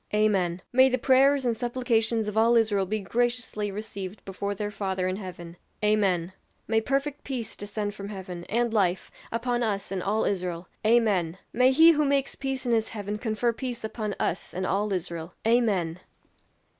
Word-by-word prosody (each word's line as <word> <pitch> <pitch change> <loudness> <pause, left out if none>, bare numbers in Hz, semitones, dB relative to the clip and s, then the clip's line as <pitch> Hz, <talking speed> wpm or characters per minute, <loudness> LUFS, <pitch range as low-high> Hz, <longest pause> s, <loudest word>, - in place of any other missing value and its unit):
"Amen!" 190 -5 +1
"May 260 +1 +6
the 255 - +1
prayers 270 +2 +4
and 235 -2 +1
supplications 230 -2 0
of 210 - -4
all 230 +2 +4
Israel 210 -4 +2
be 215 +2 -1
graciously 240 -1 -1
received 200 -1 -6
before 200 +1 -3
their 205 +1 -3
Father 190 -3 -2
in 185 +1 -2
heaven." 175 -3 -8 0.3
"Amen." 190 -4 +2 0.3
"May 225 0 +2
perfect 275 +4 -1
peace 250 -5 -4
descend 205 0 -4
from 200 -1 -7
heaven, 185 -4 -7
and 235 +1 0
life, 190 -4 +1 0.2
upon 240 +1 -1
us 200 -4 -1
and 190 -2 -2
all 210 +4 0
Israel." 180 -3 -2 0.2
"Amen!" 210 -7 +3 0.2
"May 250 +2 +5
he 320 +5 +8
who 300 -2 +2
makes 280 -1 +1
peace 270 -1 -3
in 240 - 0
his 225 -1 +2
heaven 210 -1 -5
confer 230 +1 0
peace 240 0 -5
upon 215 -2 -3
us 175 - -2
and 185 +1 -1
all 205 +3 0
Israel." 170 -2 -4
"Amen!" 205 -8 +2
215 Hz, 170 wpm, -27 LUFS, 190-240 Hz, 0.3 s, he